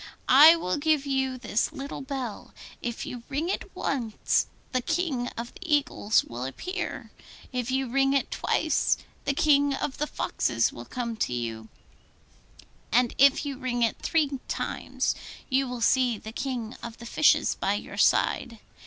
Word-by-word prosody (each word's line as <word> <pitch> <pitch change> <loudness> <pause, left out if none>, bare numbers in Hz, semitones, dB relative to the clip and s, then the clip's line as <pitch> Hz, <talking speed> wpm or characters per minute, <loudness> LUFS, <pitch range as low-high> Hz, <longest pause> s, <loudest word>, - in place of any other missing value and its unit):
I 300 +6 +9
will 180 - -1
give 300 -1 +2
you 265 -2 0
this 235 -1 -1
little 280 -2 -6
bell: 265 -5 -6 0.3
if 240 -1 -4
you 245 - -6
ring 295 +5 -1
it - - -3
once, 235 -6 0 0.2
the 255 - +1
King 265 -4 -1
of 235 +1 -5
the - - -13
Eagles 290 -9 +2
will 120 +1 -7
appear; 360 - -5 0.4
if 250 -2 -2
you 265 0 0
ring 270 +2 +2
it 275 - 0
twice, - - +1 0.3
the 280 - 0
King 285 -1 +4
of 270 0 -4
the 300 - 0
Foxes 115 - 0
will 120 - -9
come 235 - -4
to 125 - -1
you; 115 -2 -4 1.2
and 245 0 +3
if 280 +2 +5
you 275 -2 -4
ring 245 -2 -1
it 230 - 0
three 290 -4 0
times, - - -2 0.4
you 265 +1 +2
will 245 -1 -5
see 250 -1 +3
the 220 - -9
King 245 -2 -4
of 235 -1 -7
the 235 - -10
Fishes 300 +6 +3
by - - 0
your - - -7
side. 235 -3 +2
260 Hz, 160 wpm, -27 LUFS, 235-280 Hz, 1.2 s, I